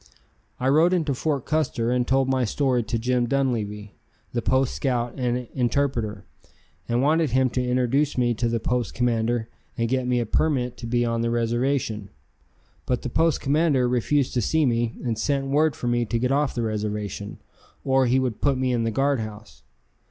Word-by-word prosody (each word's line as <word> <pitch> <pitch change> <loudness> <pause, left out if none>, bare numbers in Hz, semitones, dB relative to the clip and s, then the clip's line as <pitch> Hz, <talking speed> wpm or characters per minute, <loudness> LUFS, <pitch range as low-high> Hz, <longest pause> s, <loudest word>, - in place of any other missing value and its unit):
I 130 - 0
rode 160 +6 +4
into 160 -6 +1
Fort 140 0 -2
Custer 130 -6 0
and 125 -1 +1
told 135 0 +2
my 130 -1 +1
story 125 +1 +1
to 115 +1 -2
Jim 120 +1 0
Dunleavy, 110 -6 -1 0.4
the 120 - 0
post 130 +2 +1
scout 120 -3 -1
and 125 -1 -2
interpreter, 120 -5 -1 0.6
and 120 +2 +1
wanted 155 +1 +3
him 130 +1 +2
to 125 - -1
introduce 130 +4 +1
me 120 -1 +2
to 120 +1 -1
the 115 0 0
post 125 0 -2
commander 115 -1 0 0.3
and 115 - 0
get 130 +1 0
me 125 -1 +2
a 120 - -1
permit 125 +1 0
to 120 - -7
be 120 +1 +1
on 115 0 -1
the 115 - 0
reservation. 120 -2 -1 0.8
But 125 -1 -1
the - - -3
post 160 +4 +1
commander 140 -3 +2
refused 125 +3 +1
to 125 - +1
see 155 +8 +2
me 120 -2 0
and 115 -3 -2
sent 140 +3 0
word 150 +3 +2
for 120 - -4
me 120 0 +1
to 115 - -1
get 125 +2 0
off 145 0 +1
the 120 - -1
reservation, 105 -2 -3 0.5
or 135 -1 +3
he 125 +2 +3
would 130 -4 -1
put 140 -2 +2
me 130 0 0
in 115 -1 0
the - - +1
guard 135 +3 +1
house. 105 - -8
125 Hz, 190 wpm, -24 LUFS, 115-135 Hz, 0.8 s, rode